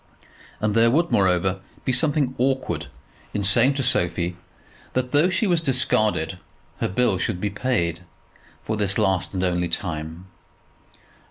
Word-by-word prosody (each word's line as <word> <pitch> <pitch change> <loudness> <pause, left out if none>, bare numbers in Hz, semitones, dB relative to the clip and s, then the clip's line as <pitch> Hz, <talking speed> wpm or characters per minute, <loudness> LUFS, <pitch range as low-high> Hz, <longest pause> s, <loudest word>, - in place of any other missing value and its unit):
And 105 -1 0
there 115 +1 +4
would, 170 +7 +1
moreover, 95 0 +2 0.3
be 130 - +1
something 140 0 +2
awkward 130 +1 -1 0.5
in 100 - -1
saying 130 +8 +4
to 135 - -1
Sophie 90 -6 +1 0.6
that, 125 0 -1
though 150 +5 +4
she 190 +4 0
was 175 -4 +2
discarded, 110 - +1 0.4
her - - 0
bill 120 +6 +1
should 105 -6 -2
be 105 +1 -2
paid 100 -7 -1 0.6
for 110 - -2
this 100 -2 0
last 95 0 0
and 95 - -1
only 90 -1 0
time. 80 0 -4
105 Hz, 145 wpm, -23 LUFS, 90-130 Hz, 0.6 s, there